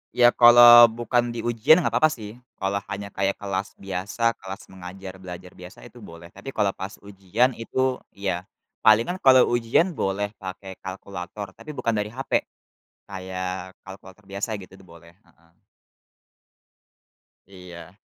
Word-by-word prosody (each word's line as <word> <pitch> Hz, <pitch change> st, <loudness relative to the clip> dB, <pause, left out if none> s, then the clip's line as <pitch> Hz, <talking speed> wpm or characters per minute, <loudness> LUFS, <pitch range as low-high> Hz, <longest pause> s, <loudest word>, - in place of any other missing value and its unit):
Ya, 120 Hz, -1 st, +6 dB
kalau 120 Hz, 0 st, +9 dB
bukan 120 Hz, +1 st, -1 dB
di 115 Hz, -, -5 dB
ujian 120 Hz, +9 st, +4 dB
enggak -, -, 0 dB
papa 155 Hz, -, +6 dB
sih, 110 Hz, -4 st, -8 dB, 0.2 s
kalau 100 Hz, +1 st, -2 dB
hanya 100 Hz, 0 st, -6 dB
kayak 100 Hz, 0 st, -1 dB
kelas 100 Hz, -1 st, -5 dB
biasa, 100 Hz, +4 st, -2 dB
kelas 95 Hz, +1 st, -8 dB
mengajar 95 Hz, +1 st, -10 dB
belajar 90 Hz, 0 st, -10 dB
biasa 90 Hz, 0 st, -13 dB
itu 120 Hz, 0 st, -14 dB
boleh. 85 Hz, -4 st, -13 dB
Tapi 105 Hz, +8 st, -10 dB
kalau 100 Hz, -2 st, +1 dB
pas 95 Hz, +2 st, -8 dB
ujian 100 Hz, +6 st, 0 dB
itu, 130 Hz, +2 st, -2 dB, 0.2 s
ya 95 Hz, -2 st, -3 dB, 0.3 s
palingan 115 Hz, +13 st, +3 dB
kalau 130 Hz, -1 st, +6 dB
ujian 120 Hz, +10 st, +2 dB
boleh 100 Hz, -, -2 dB
pakai 95 Hz, 0 st, -9 dB
kalkulator 95 Hz, +1 st, -8 dB
tapi 150 Hz, +8 st, -11 dB
bukan 115 Hz, -, -1 dB
dari 105 Hz, -1 st, -1 dB
HP, 130 Hz, +5 st, -1 dB, 0.7 s
kayak 95 Hz, -1 st, -6 dB
kalkulator 95 Hz, +1 st, -13 dB
biasa 100 Hz, +3 st, -3 dB
gitu 95 Hz, -1 st, -10 dB
boleh, 85 Hz, +1 st, -17 dB
heeh. 85 Hz, -1 st, -28 dB, 2.0 s
Iya. 90 Hz, -2 st, -12 dB
100 Hz, 140 wpm, -24 LUFS, 95-120 Hz, 2.0 s, kalau